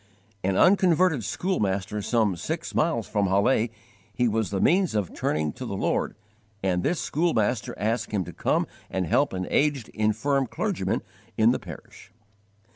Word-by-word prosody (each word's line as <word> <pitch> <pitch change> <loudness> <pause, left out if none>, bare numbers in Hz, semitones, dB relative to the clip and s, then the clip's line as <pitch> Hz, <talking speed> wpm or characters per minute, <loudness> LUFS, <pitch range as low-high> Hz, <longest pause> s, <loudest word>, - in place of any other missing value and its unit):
_ - - -33 0.5
An 95 - +1
unconverted 180 - +4
schoolmaster 105 - -1
some 110 -3 +1
six 85 - -4
miles - - +1
from 100 -1 +1
Halle 105 +5 +2 0.4
he 125 -1 +1
was 110 -1 0
the 100 - -2
means 180 - +3
of 105 -4 -1
turning 75 -1 -1
to - - -8
the - - -4
Lord; - - 0 0.5
and 90 -2 +1
this 170 - 0
schoolmaster 125 -8 0
asked 115 +3 -1
him 100 -3 0
to 85 0 -9
come - - +1 0.2
and 95 -1 -1
help 140 - +2
an 95 -1 -3
aged, 145 -5 +1
infirm 120 +6 0
clergyman - - -2 0.3
in 110 +1 +5
the - - -1
parish. 90 +2 -12
110 Hz, 160 wpm, -26 LUFS, 95-140 Hz, 0.5 s, in